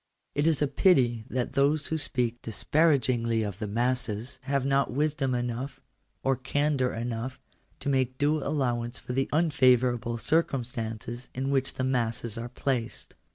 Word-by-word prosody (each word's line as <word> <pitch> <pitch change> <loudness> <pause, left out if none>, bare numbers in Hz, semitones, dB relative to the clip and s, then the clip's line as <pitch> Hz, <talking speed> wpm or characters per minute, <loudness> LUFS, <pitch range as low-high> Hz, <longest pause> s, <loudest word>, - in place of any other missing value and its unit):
It 145 +2 +1
is 155 -3 +3
a - - +2
pity 130 - +3
that 125 -1 -2
those 140 +2 +2
who 160 - -1
speak 120 -4 -1
disparagingly 120 -3 +2
of 100 -2 -5
the 105 - -3
masses 120 +2 -1
1 - - -8
have 140 -2 +1
not 140 -1 +2
wisdom 140 -1 0
enough, 120 +2 -3 0.4
or 135 0 +3
candour 130 +1 0
enough, 120 +3 -4 0.4
to - - -1
make 130 -2 +1
due 150 +2 +2
J - - -4
allowance 120 -4 -1
for 125 - -6
the 135 +1 0
unfavourable 125 -6 +3
circumstances 120 -4 -2
in 135 +2 -1
which 135 -1 +1
the 130 - -2
I - - +1
masses 115 -3 -1
are 115 +1 -5
placed. 125 -2 -3
130 Hz, 160 wpm, -28 LUFS, 120-140 Hz, 0.4 s, is